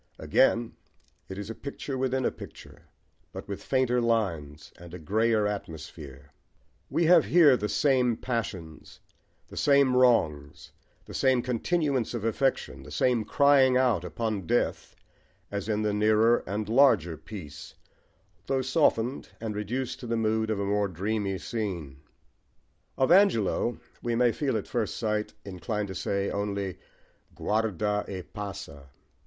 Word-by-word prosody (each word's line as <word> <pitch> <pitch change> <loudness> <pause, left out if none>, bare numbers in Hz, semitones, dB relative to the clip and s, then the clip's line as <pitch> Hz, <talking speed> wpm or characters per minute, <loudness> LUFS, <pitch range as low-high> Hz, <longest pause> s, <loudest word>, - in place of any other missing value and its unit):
Again 115 0 +2 0.6
it 95 - -7
is 105 +2 -5
a - - -4
picture 140 +2 -6
within 130 0 0
a - - +1
picture, - - -13 0.4
but - - -8
with 100 - -6
fainter 130 -2 +1
lines 85 -11 -1
and 85 0 -10
a - - -6
greyer 110 +5 +1
atmosphere: 80 -7 -7 0.6
we 170 - +1
have 170 -1 +6
here 155 -6 +6
the 105 -3 -3
same 125 -5 +2
passions, 95 -10 -5 0.5
the - - -11
same 140 -3 +4
wrongs, 75 - +1 0.3
the - - -11
same 130 -2 +2
continuance 130 0 -1
of 110 -2 -4
affection, 130 +4 -1
the - - -12
same 125 -3 +1
crying 135 +1 +4
out 125 -9 +2
upon 100 0 -3
death, - - -1 0.6
as 100 +1 -4
in 105 0 0
the 105 -1 0
nearer 110 +3 +3
and 105 +1 -3
larger 110 - +4
piece, 80 -1 -10 0.7
though 135 -1 0
softened, 130 -3 +1
and 110 -2 -4
reduced 120 +5 -3
to 120 - -8
the 115 0 -1
mood 110 0 0
of 110 -2 -1
a 100 - -1
more 100 0 +1
dreamy 100 +2 -2
scene. 90 - -4 1.0
Of 130 - +2
Angelo 145 - +3 0.2
we 120 -1 -1
may 120 0 +3
feel 135 -2 -1
at 105 - -4
first 115 -4 -2
sight 105 -2 -2
inclined 100 +2 -4
to - - -5
say 100 +2 -2
only 100 -2 -3 0.6
guarda 105 -1 0
e 95 -2 -5
passa! 85 -9 -8
110 Hz, 145 wpm, -27 LUFS, 95-125 Hz, 1.0 s, have